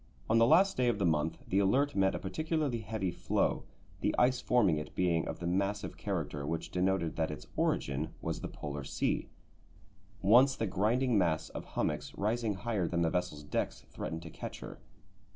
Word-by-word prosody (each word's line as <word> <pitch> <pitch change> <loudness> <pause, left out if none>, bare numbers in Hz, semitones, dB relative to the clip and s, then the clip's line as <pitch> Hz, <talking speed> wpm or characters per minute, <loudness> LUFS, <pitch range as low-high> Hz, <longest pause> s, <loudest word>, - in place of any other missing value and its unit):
On 115 - +5
the 115 - +6
last 195 +8 +5
day 125 -1 +2
of 120 -3 +2
the 100 - 0
month 80 0 +1
the 95 - +2
Alert 135 +9 +2
met 95 -1 +3
a - - -1
particularly 150 - -1
heavy 110 -5 -2
floe, - - 0 0.3
the - - 0
ice 125 +1 +3
forming 100 -11 +3
it 75 0 -8
being 85 -3 +1
of - - -4
the 85 - -6
massive 100 +4 -1
character 80 -8 -3
which 80 +3 -3
denoted 90 -2 0
that 80 -1 +1
its 75 - -7
origin 70 +3 0
was - - -3
the - - -3
Polar 75 -1 -6
Sea. 70 - -1 0.9
Once 125 +7 +6
the 115 - -1
grinding 110 +5 +2
mass 85 -4 +1
of - - -7
hummocks, 75 -2 -2
rising 110 +1 0
higher 100 -4 -1
than 85 0 0
the 80 - +1
vessel's 90 -4 -2
decks, 75 - -2
threatened 80 +1 -5
to 80 - -9
catch - - -7
her. - - -8
95 Hz, 190 wpm, -32 LUFS, 80-115 Hz, 0.9 s, the